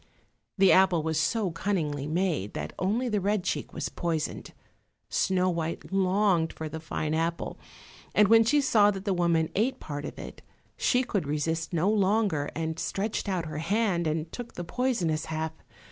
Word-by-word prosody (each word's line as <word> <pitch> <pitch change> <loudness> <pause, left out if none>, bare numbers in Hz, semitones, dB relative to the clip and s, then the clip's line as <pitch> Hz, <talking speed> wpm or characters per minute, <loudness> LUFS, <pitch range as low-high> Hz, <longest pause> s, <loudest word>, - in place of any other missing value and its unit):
The 195 -1 +6
apple 185 -4 +5
was 160 -1 0
so 195 +5 +1
cunningly 155 -6 -2
made 160 - -1
that - - -4
only 220 +7 0
the 210 -4 0
red 205 0 +1
cheek - - -2
was - - -3
poisoned. 165 -3 -3 0.6
Snow 185 -1 +1
white 165 +2 -4
longed 190 -3 +2
for 160 - -5
the 160 +1 -6
fine 155 -1 -3
apple, 165 +1 -2 0.6
and 210 - +6
when 225 +2 +7
she 290 +6 +3
saw 210 -6 +5
that 195 -1 -4
the 200 - +1
woman 170 -3 +1
ate 235 +6 0
part 145 -1 -5
of - - -7
it - - -9 0.3
she 250 0 +2
could 200 - -2
resist 160 +2 -1
no 170 +1 +1
longer, 200 -7 +2
and 160 0 -3
stretched 205 +3 -2
out 180 -3 -1
her 155 -1 -5
hand 190 -1 +1
and 155 +1 -2
took 245 -1 -8
the 175 - -4
poisonous 175 -8 -1
half. 160 0 -3
175 Hz, 175 wpm, -28 LUFS, 160-205 Hz, 0.6 s, when